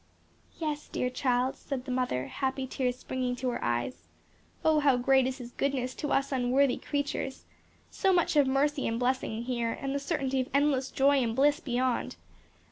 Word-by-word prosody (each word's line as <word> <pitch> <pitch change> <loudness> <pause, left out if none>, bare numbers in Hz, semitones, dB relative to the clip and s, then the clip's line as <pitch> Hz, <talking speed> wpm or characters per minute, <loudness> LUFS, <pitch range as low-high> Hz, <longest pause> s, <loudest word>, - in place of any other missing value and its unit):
"Yes, 305 -2 -3
dear 250 - -2
child," 255 0 +1
said 265 -3 -5
the 260 - -4
mother, 250 - 0
happy 265 -1 -2
tears 250 -1 -2
springing 255 -1 -2
to 250 +1 -2
her 245 - -3
eyes, 120 - -2 0.6
"Oh, 315 -1 +5
how 280 -4 +4
great 265 +1 +4
is 260 0 -3
His 245 -2 -9
goodness 255 -2 -1
to 295 - -4
us 275 +1 +1
unworthy 260 +1 +2
creatures! 285 -2 -3 0.5
so 385 - +2
much 350 -3 +2
of 290 -2 +5
mercy 275 +2 +1
and 230 +1 -1
blessing 245 -3 -1
here 235 -2 -1
and 275 0 -4
the 280 - 0
certainty 275 -3 -1
of 255 - -5
endless 280 -2 +2
joy 280 +1 +3
and 225 -2 -1
bliss 285 +2 +3
beyond! 250 -1 -1
265 Hz, 180 wpm, -29 LUFS, 250-280 Hz, 0.6 s, Oh